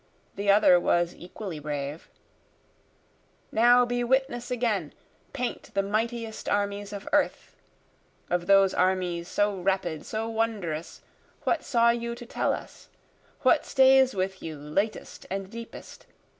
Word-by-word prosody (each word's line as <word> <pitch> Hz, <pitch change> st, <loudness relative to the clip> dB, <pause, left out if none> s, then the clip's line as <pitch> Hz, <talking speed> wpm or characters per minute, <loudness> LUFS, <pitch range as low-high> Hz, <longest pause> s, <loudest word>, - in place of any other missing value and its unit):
the 200 Hz, 0 st, -2 dB
other 200 Hz, -3 st, +6 dB
was 175 Hz, 0 st, +1 dB
equally 180 Hz, -1 st, -7 dB
brave;) 145 Hz, +1 st, -5 dB, 1.4 s
Now 245 Hz, +2 st, +5 dB
be 245 Hz, 0 st, -1 dB
witness 245 Hz, -1 st, 0 dB
again, 220 Hz, -10 st, -1 dB, 0.4 s
paint 250 Hz, -3 st, -4 dB
the 195 Hz, -, +2 dB
mightiest 225 Hz, +2 st, -2 dB
armies 205 Hz, 0 st, -1 dB
of 200 Hz, -1 st, -7 dB
earth, 295 Hz, -1 st, 0 dB, 0.7 s
Of 175 Hz, 0 st, -1 dB
those 195 Hz, -1 st, +5 dB
armies 180 Hz, -2 st, 0 dB
so 205 Hz, +1 st, +1 dB
rapid 180 Hz, -4 st, -1 dB
so 220 Hz, +1 st, -3 dB
wondrous 215 Hz, -8 st, -3 dB, 0.4 s
what 325 Hz, -, 0 dB
saw 235 Hz, -3 st, +3 dB
you 235 Hz, 0 st, -3 dB
to 240 Hz, 0 st, -10 dB
tell -, -, -1 dB
us? -, -, -7 dB, 0.5 s
What -, -, +4 dB
stays 265 Hz, -2 st, +5 dB
with 190 Hz, 0 st, -2 dB
you 160 Hz, -2 st, -6 dB
latest 175 Hz, +10 st, -3 dB
and 195 Hz, 0 st, -4 dB
deepest? 230 Hz, 0 st, -10 dB
205 Hz, 130 wpm, -27 LUFS, 180-235 Hz, 1.4 s, other